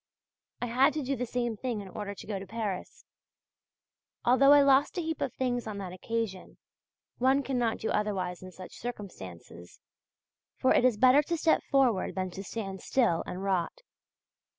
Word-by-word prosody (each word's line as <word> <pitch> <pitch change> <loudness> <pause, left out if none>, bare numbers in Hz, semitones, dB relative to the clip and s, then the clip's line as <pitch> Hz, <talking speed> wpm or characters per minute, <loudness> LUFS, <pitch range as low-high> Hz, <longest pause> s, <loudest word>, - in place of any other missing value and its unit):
I - - +1
had 260 +5 +3
to 305 - -2
do 275 +2 -1
the 250 0 -3
same 240 -1 -2
thing 235 0 -3
in 200 - -8
order 200 +1 -6
to - - -10
go 205 -2 -3
to 195 - -9
Paris; 210 -3 -5 1.2
although 265 +3 +6
I 290 -1 +8
lost 275 +3 +4
a - - +1
heap 320 -1 -4
of - - -1
things 245 -2 -1
on 210 -2 -5
that 190 -3 -6
occasion, 210 0 -4 0.6
one 265 +3 +3
cannot 245 -4 0
do 220 - -3
otherwise 190 -4 -1
in 185 0 -9
such 185 0 -11
circumstances. 95 - -9 0.8
For 260 - +3
it - - +3
is 245 -4 +3
better 255 +4 +6
to 335 +3 -2
step 320 0 +3
forward 260 -8 +2
than 185 -1 -2
to 195 +3 -7
stand 195 -3 -5
still 235 -11 +2
and 185 +2 -5
rot. 195 - -1
230 Hz, 175 wpm, -29 LUFS, 190-260 Hz, 1.2 s, I